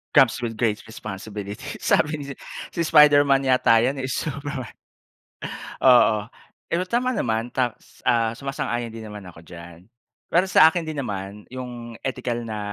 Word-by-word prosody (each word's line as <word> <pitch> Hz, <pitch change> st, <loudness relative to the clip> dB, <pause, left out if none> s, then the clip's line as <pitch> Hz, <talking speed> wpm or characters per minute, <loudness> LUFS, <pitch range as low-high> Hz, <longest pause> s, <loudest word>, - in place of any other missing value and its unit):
"Comes 130 Hz, -3 st, +6 dB
with 115 Hz, -1 st, -3 dB
great 110 Hz, -3 st, +1 dB
responsibility." 105 Hz, -1 st, -7 dB, 0.2 s
sabi 150 Hz, -, +2 dB
ni 145 Hz, -, -6 dB, 0.5 s
si 170 Hz, -, -2 dB
Spiderman 145 Hz, -3 st, +5 dB
yata 125 Hz, -3 st, +5 dB
yan 130 Hz, +4 st, +1 dB
eh, 130 Hz, -, -2 dB
si 135 Hz, -, -2 dB
Superman. 140 Hz, -3 st, -5 dB, 1.1 s
Oo, 115 Hz, -5 st, +5 dB, 0.4 s
pero 175 Hz, +2 st, 0 dB
tama 250 Hz, +3 st, 0 dB
naman. 115 Hz, +1 st, -1 dB
Ta 125 Hz, -3 st, +1 dB, 0.3 s
ah, 115 Hz, -2 st, +3 dB
sumasang-ayon 120 Hz, -3 st, -3 dB
din 115 Hz, -1 st, -8 dB
naman 105 Hz, -1 st, -9 dB
ako 85 Hz, -2 st, -13 dB
diyan. 85 Hz, 0 st, -11 dB, 0.5 s
Pero 180 Hz, +3 st, +4 dB
sa 160 Hz, -4 st, +7 dB
akin 175 Hz, 0 st, -2 dB
din 155 Hz, -2 st, -4 dB
naman, 100 Hz, -2 st, -6 dB
yung 120 Hz, -2 st, -7 dB
ethical 125 Hz, -2 st, -3 dB
na 110 Hz, -1 st, -4 dB
120 Hz, 150 wpm, -23 LUFS, 110-140 Hz, 1.1 s, sa